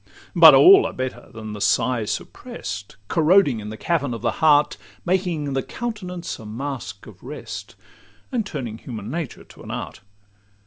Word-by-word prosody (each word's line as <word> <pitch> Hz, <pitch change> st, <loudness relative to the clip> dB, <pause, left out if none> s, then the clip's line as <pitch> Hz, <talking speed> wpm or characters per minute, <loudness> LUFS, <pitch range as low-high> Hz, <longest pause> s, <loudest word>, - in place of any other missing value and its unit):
But -, -, +10 dB
all 390 Hz, +2 st, +8 dB
are -, -, -7 dB
better 130 Hz, 0 st, -5 dB
than 110 Hz, -2 st, -8 dB
the 105 Hz, -, -7 dB
sigh 115 Hz, +4 st, +2 dB
supprest, 100 Hz, -1 st, -6 dB
Corroding 160 Hz, -, +4 dB
in 105 Hz, 0 st, -7 dB
the 110 Hz, -, -7 dB
cavern 145 Hz, -3 st, -1 dB
of 115 Hz, -, -9 dB
the -, -, +2 dB
heart, 150 Hz, -2 st, +5 dB, 0.3 s
Making 175 Hz, -6 st, 0 dB
the 135 Hz, -, 0 dB
countenance 185 Hz, -, -5 dB
a 110 Hz, -, -10 dB
masque 120 Hz, -2 st, -6 dB
of 95 Hz, -5 st, -14 dB
rest, 145 Hz, +4 st, -8 dB, 0.6 s
And 240 Hz, -4 st, 0 dB
turning 125 Hz, -, -6 dB
human 110 Hz, -3 st, -7 dB
nature 160 Hz, -6 st, -5 dB
to -, -, -17 dB
an -, -, -11 dB
art. -, -, -6 dB
135 Hz, 165 wpm, -22 LUFS, 110-170 Hz, 0.6 s, But